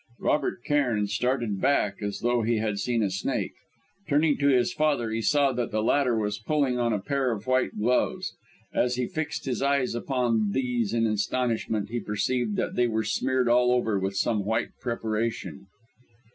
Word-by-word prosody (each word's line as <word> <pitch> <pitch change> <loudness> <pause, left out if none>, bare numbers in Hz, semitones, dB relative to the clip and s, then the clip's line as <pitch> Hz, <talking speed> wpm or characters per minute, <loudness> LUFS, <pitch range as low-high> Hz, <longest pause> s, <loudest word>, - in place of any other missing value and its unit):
Robert 140 -5 0
Cairn 125 -8 +1
started 115 -1 -1
back, 105 -8 +1
as 100 -1 -4
though 120 0 +2
he 115 +1 +1
had 110 -2 -1
seen 120 -1 0
a 100 - 0
snake. 95 0 -2 0.6
Turning 145 0 +3
to 140 - +2
his 125 -3 +3
father, 145 -7 +1
he 115 +1 -1
saw 140 +3 +3
that 125 -1 -2
the 110 0 -1
latter 125 -1 +2
was 105 -1 -1
pulling 130 +1 0
on 120 -1 +1
a 105 - +1
pair 135 +4 -1
of 110 -2 -4
white 130 0 +1
gloves. 120 +4 0 0.4
As 125 0 +1
he 125 0 -1
fixed 155 +2 -4
his 130 -2 -2
eyes 140 -3 +1
upon 120 -4 0
these 125 -5 0
in 115 0 +1
astonishment, 110 0 -1
he 120 - -1
perceived 125 - -1
that 190 - -1
they 125 - +3
were 110 -1 0
smeared 130 +3 0
all 125 +1 +4
over 115 -5 +1
with 95 +1 -2
some 105 0 +1
white 110 +3 0
preparation. 110 - -3
120 Hz, 180 wpm, -26 LUFS, 110-130 Hz, 0.6 s, all